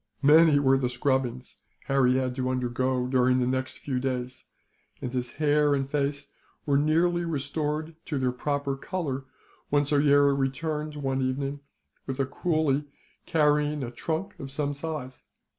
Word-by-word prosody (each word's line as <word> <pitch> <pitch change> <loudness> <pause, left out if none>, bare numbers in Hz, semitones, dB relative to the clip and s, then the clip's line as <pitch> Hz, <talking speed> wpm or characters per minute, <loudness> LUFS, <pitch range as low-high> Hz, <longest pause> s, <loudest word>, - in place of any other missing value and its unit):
Many 155 +1 +7
were 135 -1 +4
the 125 -2 0
scrubbings 125 -1 -1 0.3
Harry 135 -2 +3
had 130 -1 0
to 130 0 -2
undergo, 130 0 0
during 125 0 +3
the 125 - +2
next 130 +1 -2
few 130 -3 -3
days; 125 -1 -3 0.5
and 125 - -5
his 125 -1 -3
hair 150 -1 +3
and 135 -1 -1
face 140 0 -2 0.3
were 140 - +2
nearly 170 +4 +2
restored 155 0 -2
to 150 - -2
their 130 -1 +1
proper 140 +2 -2
colour 140 -4 -4 0.4
when 145 0 +3
Soyera 145 -1 +4
returned, 150 +3 -2
one 135 -2 -1
evening, 135 +2 -2 0.5
with 135 0 -4
a 135 - +2
coolie 150 -1 0 0.4
carrying 150 -2 +2
a 120 - -5
trunk 165 +10 -4
of 135 - -6
some 145 +1 -2
size. 140 -3 -6
140 Hz, 150 wpm, -27 LUFS, 130-150 Hz, 0.5 s, Many